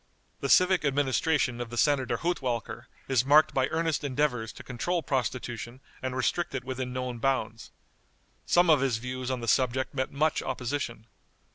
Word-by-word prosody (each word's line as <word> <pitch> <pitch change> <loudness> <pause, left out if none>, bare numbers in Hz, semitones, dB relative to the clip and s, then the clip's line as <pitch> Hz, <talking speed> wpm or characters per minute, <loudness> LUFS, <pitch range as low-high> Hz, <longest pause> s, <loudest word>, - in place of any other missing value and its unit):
The - - -3
civic 185 -1 +5
administration 140 -2 +1
of 120 - -5
the 120 - -7
Senator 140 -1 +2
Hudtwalcker 130 - -3 0.2
is 130 -3 +2
marked 150 +3 +5
by 135 -1 +2
earnest 160 -1 -1
endeavors 130 -5 0
to - - -11
control 160 +8 -2
prostitution 125 -2 -3 0.2
and 130 -1 -3
restrict 135 +4 -1
it 130 - -3
within 130 -1 -4
known 125 -1 -4
bounds. 115 -4 -1 0.8
Some 175 -1 +5
of 150 -4 +5
his 130 -5 +1
views 125 +2 -5
on 130 -2 -2
the 115 - -5
subject 130 +3 +1
met 130 -1 -2
much 155 +2 +1
opposition. 125 -3 -3
130 Hz, 160 wpm, -28 LUFS, 120-145 Hz, 0.8 s, civic